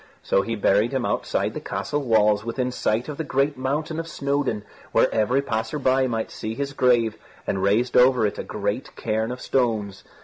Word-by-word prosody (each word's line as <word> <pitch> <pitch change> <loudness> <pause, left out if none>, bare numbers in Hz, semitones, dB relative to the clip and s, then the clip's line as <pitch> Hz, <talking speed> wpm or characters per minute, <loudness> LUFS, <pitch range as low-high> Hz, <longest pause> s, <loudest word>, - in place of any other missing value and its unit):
So 95 - +2
he 115 +3 -3
buried 105 +3 +2
him 130 -2 0
outside - - -1
the - - -4
castle 145 - -3
walls 105 -4 +3
within 125 +2 -2
sight 115 -1 -1
of 150 -2 -6
the 160 - -2
great 140 0 0
mountain 150 +5 -2
of 165 - -4
Snowdon, 140 -8 -1 0.3
where - - +3
every 125 +6 +2
passer 110 0 -2
by 130 -1 +2
might 115 -2 -2
see 110 +1 -5
his 140 +2 -3
grave, 120 -4 +2 0.3
and 95 - -1
raised 110 +6 +2
over 125 -2 +5
it 105 - -2
a - - -3
great - - -3
cairn 110 +2 -1
of 125 - -6
stones. 110 -8 -1
125 Hz, 195 wpm, -24 LUFS, 110-135 Hz, 0.3 s, over